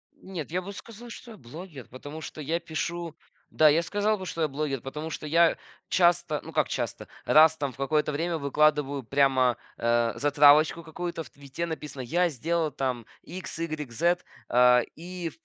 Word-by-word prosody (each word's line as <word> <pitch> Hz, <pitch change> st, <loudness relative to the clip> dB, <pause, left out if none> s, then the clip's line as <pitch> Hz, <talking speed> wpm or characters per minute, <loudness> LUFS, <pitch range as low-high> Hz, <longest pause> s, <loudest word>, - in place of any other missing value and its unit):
Нет, 165 Hz, -6 st, -7 dB
я 180 Hz, +1 st, -1 dB
бы 200 Hz, +2 st, -8 dB
сказал, 230 Hz, +3 st, -11 dB
что 235 Hz, 0 st, -10 dB
я 215 Hz, -, -11 dB
блогер, 145 Hz, +2 st, -10 dB
потому 145 Hz, +5 st, -9 dB
что 155 Hz, -, -8 dB
я 165 Hz, +4 st, -1 dB
пишу, 170 Hz, 0 st, -4 dB, 0.3 s
да, 155 Hz, -1 st, +5 dB
я 165 Hz, +3 st, +3 dB
сказал 205 Hz, +3 st, 0 dB
бы, 190 Hz, -, -7 dB
что 165 Hz, -2 st, -4 dB
я 155 Hz, -, +3 dB
блогер, 140 Hz, -3 st, -3 dB
потому 150 Hz, +4 st, -6 dB
что 155 Hz, -, -6 dB
я 165 Hz, +2 st, +4 dB, 0.3 s
часто, 175 Hz, -1 st, +2 dB
ну, -, -, -9 dB
как -, -, +2 dB
часто, -, -, -4 dB, 0.2 s
раз 155 Hz, +1 st, +6 dB
там 140 Hz, -2 st, -2 dB
в -, -, -18 dB
какое-то 150 Hz, +2 st, 0 dB
время 165 Hz, +3 st, -1 dB
выкладываю 145 Hz, -1 st, +1 dB
прямо, 130 Hz, -1 st, +2 dB, 0.2 s
э, 115 Hz, 0 st, +1 dB
затравочку 145 Hz, +3 st, +5 dB
какую-то. 165 Hz, +1 st, -5 dB
В -, -, -15 dB
"Твиттере" 140 Hz, +4 st, -6 dB
написано: 150 Hz, -4 st, -6 dB
"Я 175 Hz, +8 st, +1 dB
сделал 160 Hz, +3 st, -1 dB
там 125 Hz, -4 st, -3 dB, 0.2 s
икс, 185 Hz, -2 st, -8 dB
игрек, 155 Hz, -6 st, -4 dB
зет". 175 Hz, +8 st, +1 dB, 0.2 s
А, 125 Hz, 0 st, +6 dB
и 175 Hz, 0 st, -6 dB
155 Hz, 180 wpm, -27 LUFS, 140-170 Hz, 0.3 s, раз